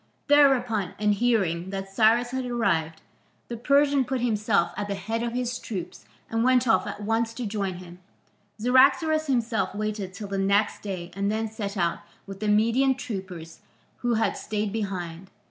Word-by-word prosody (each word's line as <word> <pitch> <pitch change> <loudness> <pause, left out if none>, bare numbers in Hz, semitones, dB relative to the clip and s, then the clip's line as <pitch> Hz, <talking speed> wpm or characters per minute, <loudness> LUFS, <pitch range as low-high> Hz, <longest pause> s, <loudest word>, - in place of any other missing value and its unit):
Thereupon, 250 -9 +3
and 210 0 +2
hearing 195 -6 0
that 195 0 -6
Cyrus 230 +3 +3
had 260 0 -2
arrived, 170 -10 -1 0.5
the 240 - -4
Persian 280 +3 +3
put 260 +1 -2
himself 210 -6 +1
at 205 -1 -3
the 200 - -2
head 220 +4 -3
of 235 0 -2
his 245 -1 -2
troops 190 -6 -7 0.2
and 225 0 -1
went 255 0 +3
off 225 - +3
at 205 - -6
once 225 +1 0
to 250 - -4
join 200 -3 -2
him. 175 0 -11 0.6
Cyaxares 270 +7 +3
himself 235 -6 0
waited 210 -2 -3
till 205 +1 -6
the 195 0 -3
next 200 +2 +1
day 185 -4 -6
and 200 +2 -1
then 220 +1 -1
set 205 -2 -5
out 170 -2 0 0.3
with 195 -1 -9
the 215 - -2
Median 230 +6 +3
troopers 185 -9 -7 0.4
who 240 -1 0
had 220 - +1
stayed 210 -1 -3
behind. 190 -4 -4
215 Hz, 170 wpm, -26 LUFS, 195-240 Hz, 0.6 s, Thereupon